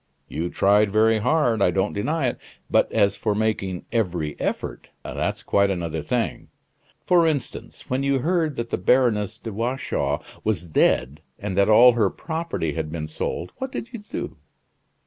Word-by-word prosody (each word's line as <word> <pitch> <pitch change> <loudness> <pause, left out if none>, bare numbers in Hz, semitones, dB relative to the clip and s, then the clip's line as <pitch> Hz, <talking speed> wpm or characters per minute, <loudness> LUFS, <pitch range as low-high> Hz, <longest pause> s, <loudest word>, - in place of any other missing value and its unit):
"You 85 +4 -3
tried 100 +2 +3
very 110 +1 +4
hard, 120 -2 +2
I 90 - +5
don't 95 +3 0
deny 145 +9 -1
it; - - -7 0.3
but - - +3
as 100 -1 +3
for 105 -2 -1
making 105 -4 -1
every 90 -10 -1
effort - - -3
that's - - -3
quite 100 0 +2
another 85 -4 -2
thing. - - -2 0.6
For 175 -2 +4
instance, 145 -6 -4
when 130 +1 -1
you 140 0 +2
heard 160 +1 0
that 115 -1 -4
the - - -1
Baroness 110 -1 +2
de 115 - -7
Watchau 120 +5 -1 0.2
was 100 -6 0
dead, 75 -3 +1 0.2
and 100 -2 -4
that 100 +2 +3
all 120 +3 +8
her 115 -5 +2
property 160 - -3
had 75 0 -3
been 80 -1 -4
sold, 85 +2 -4
what 265 0 -4
did 240 0 -6
you 235 - -5
do?" 210 - -6
110 Hz, 165 wpm, -24 LUFS, 90-130 Hz, 0.6 s, all